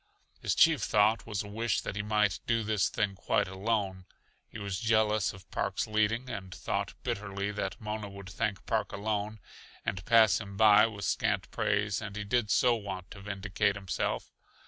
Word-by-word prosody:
His -, -, 0 dB
chief 160 Hz, -6 st, +5 dB
thought 105 Hz, +3 st, +3 dB
was 105 Hz, -2 st, -2 dB
a -, -, -9 dB
wish 110 Hz, 0 st, -1 dB
that -, -, -5 dB
he 100 Hz, -, -1 dB
might 105 Hz, -1 st, +1 dB
do 115 Hz, -1 st, +2 dB
this 105 Hz, -2 st, +1 dB
thing 100 Hz, -2 st, 0 dB
quite 95 Hz, -, 0 dB
alone. 95 Hz, -1 st, -2 dB, 0.4 s
He -, -, -9 dB
was 100 Hz, -3 st, -3 dB
jealous 110 Hz, -3 st, +2 dB
of 95 Hz, -1 st, -14 dB
Park's 100 Hz, -1 st, -1 dB
leading, 110 Hz, +3 st, +1 dB
and 95 Hz, -6 st, -6 dB
thought -, -, -3 dB
bitterly 100 Hz, 0 st, -2 dB
that 100 Hz, -2 st, -4 dB
Mona 105 Hz, -1 st, -4 dB
would 100 Hz, -1 st, -10 dB
thank 100 Hz, -1 st, -2 dB
Park 110 Hz, -3 st, 0 dB
alone 105 Hz, +1 st, -2 dB, 0.5 s
and 95 Hz, -2 st, -2 dB
pass 110 Hz, -4 st, +5 dB
him 100 Hz, -2 st, -8 dB
by 105 Hz, 0 st, +7 dB
with 100 Hz, -3 st, -6 dB
scant -, -, 0 dB
praise 100 Hz, 0 st, 0 dB
and 105 Hz, -2 st, -6 dB
he 105 Hz, -, -3 dB
did 110 Hz, +1 st, 0 dB
so 125 Hz, +2 st, +4 dB
want 100 Hz, -3 st, -6 dB
to 100 Hz, -, -10 dB
vindicate 100 Hz, 0 st, -1 dB
himself. 95 Hz, -2 st, -2 dB
105 Hz, 180 wpm, -30 LUFS, 100-110 Hz, 0.5 s, by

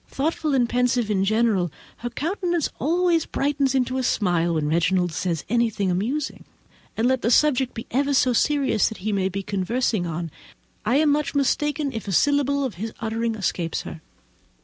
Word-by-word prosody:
Thoughtful 300 Hz, 0 st, -1 dB
and 245 Hz, -2 st, +3 dB
pensive 245 Hz, -2 st, +1 dB
in 190 Hz, -2 st, +1 dB
general, 210 Hz, -4 st, +1 dB, 0.3 s
her 240 Hz, -, -4 dB
countenance 345 Hz, -, -1 dB
always 340 Hz, +1 st, +2 dB
brightens 275 Hz, -1 st, 0 dB
into 260 Hz, 0 st, 0 dB
a -, -, -1 dB
smile 175 Hz, -7 st, +1 dB
when 155 Hz, -2 st, 0 dB
Reginald 175 Hz, +3 st, +1 dB
says 165 Hz, 0 st, -2 dB
anything 220 Hz, -4 st, +1 dB
amusing; 250 Hz, +11 st, -2 dB, 0.5 s
and, 225 Hz, +2 st, +2 dB
let 260 Hz, -1 st, +1 dB
the 230 Hz, -, +1 dB
subject 265 Hz, -1 st, +3 dB
be 230 Hz, -, -6 dB
ever 280 Hz, +3 st, +1 dB
so 255 Hz, -1 st, +3 dB
serious 275 Hz, -4 st, +2 dB
that 220 Hz, -, -8 dB
he 215 Hz, -, 0 dB
may 190 Hz, -1 st, +1 dB
be 195 Hz, +1 st, -4 dB
conversing 200 Hz, 0 st, -1 dB
on, 165 Hz, 0 st, -4 dB, 0.5 s
I 235 Hz, +5 st, +2 dB
am 300 Hz, +1 st, +4 dB
much 295 Hz, 0 st, 0 dB
mistaken 285 Hz, +1 st, 0 dB
if 225 Hz, -2 st, -6 dB
a -, -, -2 dB
syllable 280 Hz, -, +2 dB
of 260 Hz, -5 st, -2 dB
his 225 Hz, 0 st, -3 dB
uttering 225 Hz, 0 st, -2 dB
escapes 175 Hz, -5 st, -2 dB
her. 160 Hz, -, -8 dB
240 Hz, 175 wpm, -23 LUFS, 195-280 Hz, 0.5 s, am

